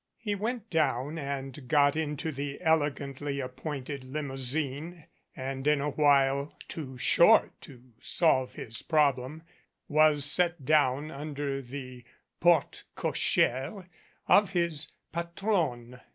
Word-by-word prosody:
He 210 -2 -3
went 225 +2 -4
down 155 -1 0
and 135 -1 -6
got 145 +2 +3
into 155 0 -2
the 140 0 -5
elegantly 145 -3 -1
appointed 135 +1 -5
limousine 145 +4 -3 0.3
and 135 +1 -4
in 150 -1 +3
a 145 +1 -1
while, 140 0 +2
too 130 -5 -7
short - - +5
to 125 -2 -14
solve 130 -7 +1
his 115 0 -5
problem, 150 -1 0 0.4
was 150 -2 +4
set 170 -1 +3
down 145 0 +2
under 145 -1 -4
the 130 -1 -9 0.4
porte - - +2
cochere 135 - 0 0.4
of 200 -1 +4
his 170 -4 0 0.2
patrowne. 170 - -2
145 Hz, 110 wpm, -29 LUFS, 135-160 Hz, 0.4 s, short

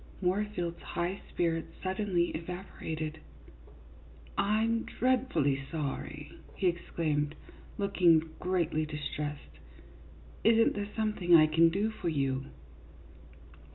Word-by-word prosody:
Moorfield's 180 -2 -1
high 175 +3 -3
spirits 165 -1 -1
suddenly 185 -2 +1
evaporated. 160 -2 -5 1.2
"I'm 220 +3 +2
dreadfully 245 - +1
sorry," 150 -1 -5 0.2
he 195 - -2
exclaimed, 155 -4 0 0.4
looking 170 -5 +3
greatly 170 -4 0
distressed. 145 - -5 0.4
" 75 +3 -21
Is 225 0 +6
n't 230 - +4
there 205 0 -3
something 210 -6 +3
I 155 -1 +8
can 165 +2 +5
do 200 +6 0
for 180 -5 -3
you 135 -3 0
170 Hz, 100 wpm, -31 LUFS, 155-200 Hz, 1.2 s, I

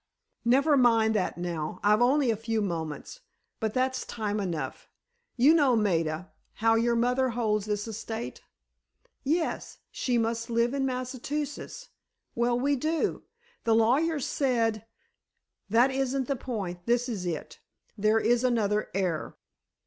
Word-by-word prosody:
"Never 275 +5 +4
mind 230 -4 +4
that 200 -5 -1
now; 170 -3 -4
I've 210 +2 +4
only 260 0 +4
a - - 0
few 225 +1 -2
moments, 165 - -4 0.4
but 220 -2 -2
that's 260 0 0
time 210 -2 -3
enough. 165 -9 -4 0.5
You 270 +6 +6
know, 285 -6 +4
Maida, 170 -5 0 0.2
how 225 +1 +2
your 235 +1 +2
mother 250 +2 +2
holds 215 -3 0
this 210 +1 -2
estate?" 220 - -6 0.8
"Yes—she 295 -5 -2
must 230 +1 -1
live 235 +2 +1
in 270 -1 0
Massachusetts. 270 - -4 0.4
Well, 240 +1 +1
we 285 +3 +2
do. 310 +5 -1 0.4
The 225 -1 +3
lawyers 275 +7 +2
said——" 230 -5 0 0.8
"That 240 +5 +4
isn't 265 -1 -1
the 275 - 0
point; 195 -9 -5
this 240 +1 +2
is 200 -7 -3
it. 165 -3 -5 0.4
There 215 +1 +2
is 240 +2 +2
another 215 -4 +1
heir." 180 -5 -2
230 Hz, 135 wpm, -28 LUFS, 210-255 Hz, 0.8 s, You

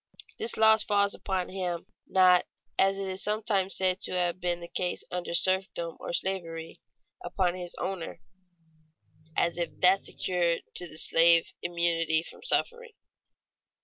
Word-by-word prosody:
This 230 - -1
loss 220 0 +6
falls 200 -1 +2
upon 190 -2 -2
him, 180 -3 -3 0.2
not, 185 -1 +5 0.3
as 195 0 +4
is 190 -1 -4
sometimes 210 -2 0
said 185 0 +2
to - - -5
have 180 0 0
been 175 -1 0
the 170 - -8
case 180 +1 -2
under 175 -1 -3
serfdom 185 -3 0
or - - -5
slavery, 170 -3 -3 0.4
upon 185 - 0
his 180 -1 -7
owner 190 -3 -4 1.2
(as 170 0 +1
if 170 - -1
that 185 +2 +5
secured 175 -2 -1
to 175 - -1
the 155 - -12
slave 165 +1 +4
immunity 165 -2 +1
from - - -13
suffering). 480 -1 -1
180 Hz, 140 wpm, -28 LUFS, 170-195 Hz, 1.2 s, loss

